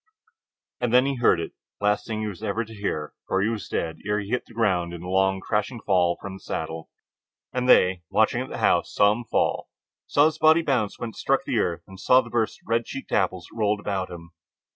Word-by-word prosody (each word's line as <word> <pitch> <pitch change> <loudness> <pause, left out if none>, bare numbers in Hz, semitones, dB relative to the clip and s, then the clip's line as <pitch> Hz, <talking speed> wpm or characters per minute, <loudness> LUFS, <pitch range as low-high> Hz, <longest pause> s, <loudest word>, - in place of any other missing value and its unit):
And 120 -2 0
then 125 +2 +5
he 140 -1 -1
heard 120 -7 +4
it, 80 - -4 0.3
the 100 - -3
last 105 0 +1
thing 110 -1 -3
he 110 - -2
was 100 -3 -6
to 110 -1 -2 0.2
hear, 80 -8 -3
for 95 - +1
he 110 - +2
was 110 -3 -4
dead 80 -1 -2
ere 105 +1 0
he 100 0 -6
hit 125 - -1
the - - -15
ground 90 -6 +1
in 85 - -9
the 90 - -7
long 95 +1 +2
crashing 105 +4 -2
fall 90 -4 +2
from 100 - -7
the 95 - -9
saddle. 80 -2 -5 0.6
And 125 0 -1
they, 90 -4 +5
watching - - +2
at - - -6
the - - -6
house, - - +2
saw 100 0 +4
him 120 +3 -3
fall, - - 0 0.4
saw 145 - +4
his 160 0 0
body 160 +1 +5
bounce 125 -9 0
when 120 - -4
it 110 - -14
struck - - +1
the - - 0
earth, 85 -1 -1
and 95 0 -13
saw 125 +5 +5
the - - -12
burst 115 -2 -1
of - - -26
red 115 0 +1
cheeked 135 - -8
apples 95 -3 0
that - - -16
rolled 105 -1 +2
about 95 -2 -2
him. 85 -1 -10
105 Hz, 240 wpm, -25 LUFS, 90-115 Hz, 0.6 s, then